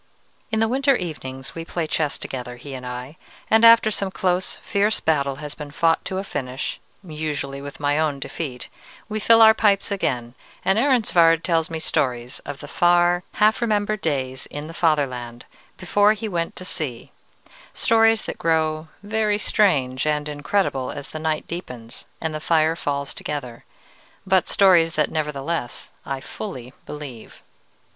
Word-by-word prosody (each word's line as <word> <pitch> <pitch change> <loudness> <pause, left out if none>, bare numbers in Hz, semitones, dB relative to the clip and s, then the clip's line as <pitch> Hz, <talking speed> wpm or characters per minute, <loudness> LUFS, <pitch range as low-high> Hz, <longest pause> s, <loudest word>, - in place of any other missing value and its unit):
In 220 - +1
the 225 - +3
winter 270 +3 +3
evenings 135 - -5
we 165 - -5
play 170 0 -3
chess 155 -1 -1
together, 125 -2 -6
he 135 +3 -9
and 125 -1 -6
I, 125 +5 -7 0.3
and 220 +1 +5
after 230 -1 +8
some 195 -1 -1
close, 185 -1 0
fierce 205 +2 0
battle 140 -4 +1
has 150 +1 -7
been 150 -1 -8
fought 165 +2 +2
to 190 - -3
a 190 - -2
finish 130 -8 -4 0.2
usually 150 -4 -4
with 140 0 -9
my 145 +1 +1
own 150 -3 0
defeat 135 -3 -5 0.4
we 215 0 -3
fill 225 +1 +6
our 220 0 +9
pipes 205 -2 +2
again, 125 -11 -1 0.3
and 195 +3 +3
Ehrensvärd 180 - +4
tells 165 -2 +1
me 165 - -3
stories 125 -5 -1
of 145 -1 -6
the 145 - -8
far, 175 +2 +3
half 215 +3 +3
remembered 215 -2 0
days 130 -4 -2
in 145 +1 -6
the 165 - -8
fatherland, 130 -8 0 0.3
before 205 +3 +3
he 220 +1 -5
went 170 -4 -2
to 185 - -6
sea: 135 -9 -4 0.6
stories 225 -1 +4
that - - -6
grow 160 -1 +1 0.2
very 210 0 +1
strange 140 - +2
and 150 0 0
incredible 145 -2 -1
as 145 -1 -6
the 155 - -6
night 155 -1 -1
deepens 125 -9 -7
and 160 -1 -3
the 155 - -3
fire 160 0 +2
falls 140 -3 -3
together, 125 -6 -6 0.6
but 190 -1 +3
stories 175 -4 +5
that, 155 - +1
nevertheless, 150 -3 -3 0.2
I 135 -1 -3
fully 130 - -7
believe. 140 -6 -9
160 Hz, 160 wpm, -23 LUFS, 140-195 Hz, 0.6 s, our